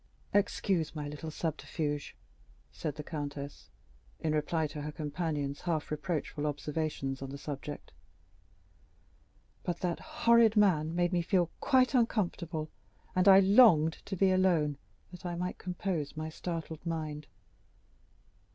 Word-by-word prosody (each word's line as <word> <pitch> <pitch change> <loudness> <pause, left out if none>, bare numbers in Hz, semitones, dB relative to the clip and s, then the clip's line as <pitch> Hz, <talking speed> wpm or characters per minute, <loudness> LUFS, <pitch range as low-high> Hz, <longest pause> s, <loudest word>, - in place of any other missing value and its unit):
"Excuse 190 -5 +1
my 150 -1 -4
little 150 +2 -6
subterfuge," 155 -2 -3 0.6
said 150 -3 -4
the 150 - -6
countess, 145 - -6 0.5
in 155 - 0
reply 155 +1 +1
to 150 0 -5
her 150 +1 -4
companion's 150 -2 -3
half 160 -4 -2
reproachful 150 -1 -2
observation 150 -2 -2
on 135 - -5
the 140 - -6
subject; 145 0 -6 1.7
"but 175 -2 -3
that 175 -2 -1
horrid 230 -2 +4
man 180 -7 +4
had 165 - -4
made 175 +1 +1
me 175 - +2
feel 175 -1 +1
quite 260 0 +3
uncomfortable, 175 -9 0 0.4
and 185 +2 +3
I 195 0 +9
longed 190 -6 +6
to 195 - -3
be 190 +1 +4
alone, 170 -6 +2 0.3
that 180 - -11
I 175 -1 -3
might 180 +1 -3
compose 180 -5 -3
my 155 0 -3
startled 160 -1 -5
mind." 155 -3 -4
160 Hz, 135 wpm, -31 LUFS, 150-180 Hz, 1.7 s, I